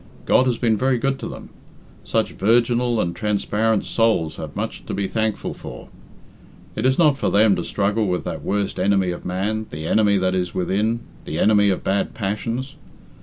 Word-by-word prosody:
God 130 Hz, -, +4 dB
has 120 Hz, -2 st, +1 dB
been 115 Hz, -3 st, +2 dB
very 130 Hz, +2 st, +2 dB
good 135 Hz, +2 st, -1 dB
to -, -, -5 dB
them. -, -, -9 dB, 0.5 s
Such -, -, 0 dB
virginal 120 Hz, +2 st, +2 dB
and 85 Hz, -4 st, -1 dB
transparent 105 Hz, 0 st, 0 dB
souls 110 Hz, -9 st, +1 dB
have -, -, -7 dB
much -, -, -4 dB
to -, -, -3 dB
be 100 Hz, -1 st, -1 dB
thankful 110 Hz, 0 st, -2 dB
for. -, -, -10 dB, 0.9 s
It 110 Hz, +4 st, +1 dB
is 130 Hz, -, +2 dB
not 150 Hz, -5 st, +4 dB
for -, -, +1 dB
them 105 Hz, -1 st, +4 dB
to -, -, -2 dB
struggle 105 Hz, +2 st, 0 dB
with 90 Hz, -1 st, -1 dB
that -, -, -5 dB
worst 100 Hz, 0 st, -2 dB
enemy 95 Hz, -1 st, +2 dB
of 85 Hz, -, -7 dB
man, 105 Hz, +4 st, -2 dB
the 80 Hz, +1 st, -6 dB
enemy 100 Hz, +3 st, +3 dB
that 95 Hz, -1 st, +1 dB
is 90 Hz, -1 st, -2 dB
within, 105 Hz, +6 st, 0 dB, 0.2 s
the 80 Hz, -, -4 dB
enemy 105 Hz, -1 st, +4 dB
of 95 Hz, -, -1 dB
bad 100 Hz, +1 st, -1 dB
passions. 115 Hz, +6 st, -3 dB
105 Hz, 185 wpm, -22 LUFS, 95-115 Hz, 0.9 s, God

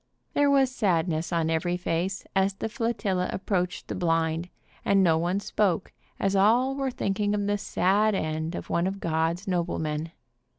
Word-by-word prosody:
There 290 Hz, 0 st, +3 dB
was 270 Hz, -2 st, +3 dB
sadness 170 Hz, -5 st, 0 dB
on 165 Hz, -1 st, +1 dB
every 175 Hz, +2 st, 0 dB
face 180 Hz, +3 st, -2 dB
as 195 Hz, 0 st, +2 dB
the 220 Hz, -, -4 dB
flotilla 215 Hz, -6 st, -1 dB
ap 190 Hz, -, -6 dB
proached 180 Hz, -3 st, -1 dB
the -, -, -5 dB
blind, 165 Hz, 0 st, 0 dB, 0.3 s
and 195 Hz, -1 st, +4 dB
no 165 Hz, -3 st, +4 dB
one 175 Hz, +4 st, 0 dB
spoke, 200 Hz, -3 st, 0 dB, 0.3 s
as 195 Hz, 0 st, +1 dB
all 235 Hz, +7 st, +4 dB
were 270 Hz, -1 st, -1 dB
thinking 205 Hz, -3 st, -1 dB
of 205 Hz, -1 st, -1 dB
the 205 Hz, 0 st, 0 dB
sad 200 Hz, +3 st, +2 dB
end 160 Hz, 0 st, -2 dB
of -, -, -6 dB
one 170 Hz, +2 st, +1 dB
of 195 Hz, +1 st, -3 dB
God's 165 Hz, +3 st, -1 dB
noblemen. 165 Hz, -3 st, -1 dB
185 Hz, 170 wpm, -27 LUFS, 165-205 Hz, 0.3 s, and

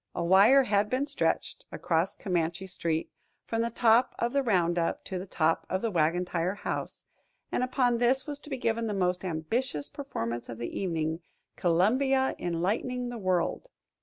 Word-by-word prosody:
A 170 Hz, -, -1 dB
wire 200 Hz, +10 st, +6 dB
had 205 Hz, -2 st, +1 dB
been 255 Hz, +3 st, 0 dB
stretched 290 Hz, -, -1 dB
across 165 Hz, +2 st, 0 dB
Comanche 175 Hz, -1 st, -2 dB
Street 170 Hz, -3 st, -2 dB, 0.3 s
from 225 Hz, 0 st, -1 dB
the 230 Hz, -, 0 dB
top 235 Hz, +1 st, +3 dB
of 235 Hz, +1 st, -1 dB
the 280 Hz, -, +3 dB
Roundup 175 Hz, -7 st, +1 dB
to 185 Hz, -, -4 dB
the 190 Hz, -, -7 dB
top 165 Hz, -2 st, 0 dB
of 190 Hz, +3 st, -1 dB
the 230 Hz, -, 0 dB
Wagon 170 Hz, +1 st, +1 dB
Tire 175 Hz, +2 st, -1 dB
House, -, -, -5 dB, 0.5 s
and -, -, 0 dB
upon 255 Hz, -2 st, +1 dB
this 255 Hz, +2 st, +2 dB
was 290 Hz, -1 st, -4 dB
to 295 Hz, -, -13 dB
be 270 Hz, -, -3 dB
given 230 Hz, -1 st, 0 dB
the 210 Hz, -, -2 dB
most 180 Hz, -1 st, 0 dB
ambitious 160 Hz, -, -2 dB
performance 120 Hz, -, -5 dB
of 115 Hz, -, -6 dB
the 120 Hz, 0 st, -5 dB
evening, 160 Hz, -3 st, -1 dB, 0.4 s
"Columbia 260 Hz, +10 st, +2 dB
Enlightening 210 Hz, +9 st, -1 dB
the 240 Hz, -1 st, -6 dB
World." 185 Hz, -, 0 dB
195 Hz, 170 wpm, -29 LUFS, 170-245 Hz, 0.5 s, wire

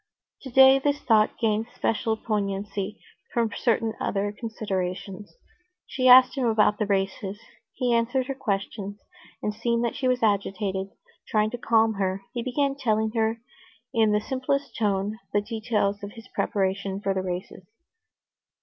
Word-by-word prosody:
Today 265 Hz, +1 st, +6 dB
this 285 Hz, +1 st, 0 dB
thought 220 Hz, -6 st, +3 dB
gained 220 Hz, -1 st, 0 dB
special 225 Hz, 0 st, 0 dB
poignancy 205 Hz, -1 st, -3 dB, 0.3 s
from 230 Hz, -2 st, 0 dB
certain 225 Hz, -2 st, +1 dB
other 205 Hz, +1 st, -1 dB
considerations. 200 Hz, -3 st, -5 dB, 0.5 s
She 255 Hz, -1 st, 0 dB
asked 255 Hz, +1 st, +8 dB
him 260 Hz, -3 st, 0 dB
about 215 Hz, -2 st, +3 dB
the 210 Hz, -, 0 dB
races. 195 Hz, 0 st, -1 dB, 0.3 s
He 245 Hz, -2 st, 0 dB
answered 240 Hz, +3 st, +1 dB
her 275 Hz, -, -3 dB
questions, 205 Hz, -5 st, -3 dB, 0.5 s
and, 210 Hz, -, -1 dB
seeing 235 Hz, +2 st, 0 dB
that 235 Hz, -, -1 dB
she 265 Hz, -, -1 dB
was 250 Hz, -1 st, +1 dB
agitated, 195 Hz, -2 st, 0 dB, 0.4 s
trying 215 Hz, 0 st, +1 dB
to 245 Hz, -, -5 dB
calm 225 Hz, -1 st, +3 dB
her, 190 Hz, 0 st, -1 dB
he 240 Hz, -, -2 dB
began 275 Hz, +3 st, 0 dB
telling 220 Hz, -5 st, 0 dB
her 225 Hz, 0 st, 0 dB, 0.5 s
in 220 Hz, -3 st, +3 dB
the 210 Hz, -, +3 dB
simplest 270 Hz, +4 st, -2 dB
tone 205 Hz, 0 st, -1 dB
the 205 Hz, -, +3 dB
details 215 Hz, -2 st, -1 dB
of 200 Hz, 0 st, -7 dB
his 225 Hz, +1 st, -12 dB
preparations 195 Hz, -1 st, -1 dB
for 195 Hz, -, +1 dB
the 190 Hz, -, -1 dB
races. 180 Hz, 0 st, -6 dB
220 Hz, 150 wpm, -26 LUFS, 200-235 Hz, 0.5 s, asked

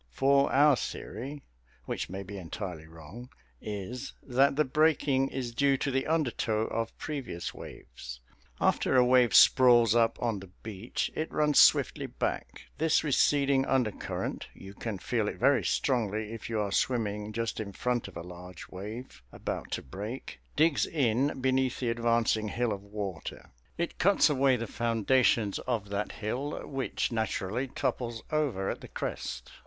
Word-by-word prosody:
For 140 Hz, -, +3 dB
our 145 Hz, +1 st, +6 dB
theory 135 Hz, +6 st, -6 dB, 0.4 s
which -, -, -3 dB
may 95 Hz, +2 st, -5 dB
be 100 Hz, +2 st, -9 dB
entirely 80 Hz, -1 st, -6 dB
wrong 80 Hz, +10 st, -11 dB, 0.3 s
is 110 Hz, +6 st, -5 dB
that 135 Hz, +2 st, +3 dB
the 150 Hz, +1 st, +3 dB
breaking 140 Hz, -2 st, +2 dB
is 125 Hz, -3 st, -4 dB
due 140 Hz, +2 st, +3 dB
to 140 Hz, -, -1 dB
the 135 Hz, 0 st, 0 dB
undertow 125 Hz, -8 st, 0 dB
of 115 Hz, 0 st, -3 dB
previous 135 Hz, -, -5 dB
waves. -, -, -10 dB, 0.4 s
After -, -, +2 dB
a 125 Hz, -, +6 dB
wave 125 Hz, -2 st, +4 dB
sprawls 120 Hz, -4 st, +7 dB
up 115 Hz, -1 st, +3 dB
on 115 Hz, -4 st, -1 dB
the 95 Hz, -1 st, -11 dB
beach, 110 Hz, +1 st, -3 dB
it 155 Hz, -, -3 dB
runs 150 Hz, -1 st, +3 dB
swiftly -, -, +5 dB
back. -, -, -4 dB, 0.2 s
This 160 Hz, 0 st, +3 dB
receding 140 Hz, -2 st, +3 dB
undercurrent 125 Hz, -6 st, -1 dB
you 95 Hz, +1 st, -11 dB
can 110 Hz, 0 st, -4 dB
feel 110 Hz, +3 st, -1 dB
it -, -, -4 dB
very 140 Hz, -1 st, +3 dB
strongly 110 Hz, -4 st, 0 dB
if 115 Hz, -, -7 dB
you 110 Hz, -2 st, -1 dB
are 100 Hz, -2 st, -1 dB
swimming 105 Hz, -2 st, 0 dB
just 115 Hz, +1 st, -3 dB
in 105 Hz, -2 st, -4 dB
front 120 Hz, +4 st, -1 dB
of 100 Hz, -, -10 dB
a 85 Hz, -, -6 dB
large 90 Hz, 0 st, -10 dB
wave 105 Hz, -, -8 dB
about -, -, -5 dB
to -, -, -3 dB
break 105 Hz, -, -7 dB, 0.2 s
digs 155 Hz, -1 st, +3 dB
in 135 Hz, -1 st, +1 dB
beneath 130 Hz, -1 st, +1 dB
the 120 Hz, -3 st, 0 dB
advancing 115 Hz, -2 st, +1 dB
hill 115 Hz, +1 st, 0 dB
of 100 Hz, -, -6 dB
water. 100 Hz, -4 st, -6 dB, 0.3 s
It 170 Hz, 0 st, -3 dB
cuts 195 Hz, -4 st, +4 dB
away 135 Hz, -2 st, +3 dB
the 115 Hz, -1 st, -3 dB
foundations 115 Hz, -1 st, +2 dB
of 110 Hz, -5 st, -1 dB
that 100 Hz, +1 st, -2 dB
hill, 125 Hz, +7 st, -4 dB
which 135 Hz, -2 st, -2 dB
naturally 110 Hz, +1 st, -1 dB
topples 120 Hz, -3 st, -3 dB
over 140 Hz, -11 st, 0 dB
at -, -, -7 dB
the -, -, -9 dB
crest. -, -, -5 dB
120 Hz, 160 wpm, -29 LUFS, 105-135 Hz, 0.4 s, sprawls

